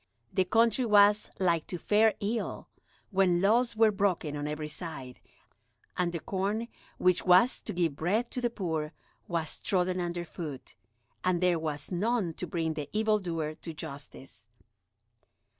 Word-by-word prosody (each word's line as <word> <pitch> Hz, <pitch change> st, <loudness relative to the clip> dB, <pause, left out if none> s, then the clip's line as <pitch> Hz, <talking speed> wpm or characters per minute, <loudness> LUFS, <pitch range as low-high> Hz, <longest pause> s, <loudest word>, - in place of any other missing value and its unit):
The 185 Hz, -, +2 dB
country 230 Hz, +5 st, +3 dB
was 210 Hz, -2 st, +5 dB
like 170 Hz, -4 st, +1 dB
to 180 Hz, -, -4 dB
fare 215 Hz, +5 st, +3 dB
ill 220 Hz, +3 st, -3 dB, 0.4 s
when 185 Hz, -3 st, +3 dB
laws 230 Hz, +5 st, +3 dB
were 220 Hz, 0 st, +5 dB
broken 190 Hz, -7 st, 0 dB
on 145 Hz, 0 st, -3 dB
every 150 Hz, 0 st, -3 dB
side, 150 Hz, -6 st, -7 dB, 0.8 s
and 180 Hz, -1 st, 0 dB
the 170 Hz, -, -3 dB
corn 200 Hz, +7 st, -2 dB, 0.3 s
which 180 Hz, -1 st, +3 dB
was 185 Hz, +7 st, +5 dB
to -, -, -6 dB
give 170 Hz, -5 st, 0 dB
bread 215 Hz, +9 st, 0 dB
to 250 Hz, -, -3 dB
the 240 Hz, -, +1 dB
poor 160 Hz, -8 st, -3 dB, 0.3 s
was 165 Hz, -3 st, -3 dB
trodden 185 Hz, -1 st, 0 dB
underfoot, 170 Hz, -5 st, -5 dB, 0.5 s
and 180 Hz, -1 st, +2 dB
there 180 Hz, -2 st, +2 dB
was 155 Hz, -1 st, -3 dB
none 200 Hz, -1 st, 0 dB
to 180 Hz, -, -5 dB
bring 160 Hz, -1 st, -1 dB
the 150 Hz, -2 st, -5 dB
evildoer 190 Hz, -8 st, 0 dB
to 165 Hz, +1 st, -8 dB
justice. 135 Hz, -6 st, -8 dB
180 Hz, 145 wpm, -30 LUFS, 160-210 Hz, 0.8 s, was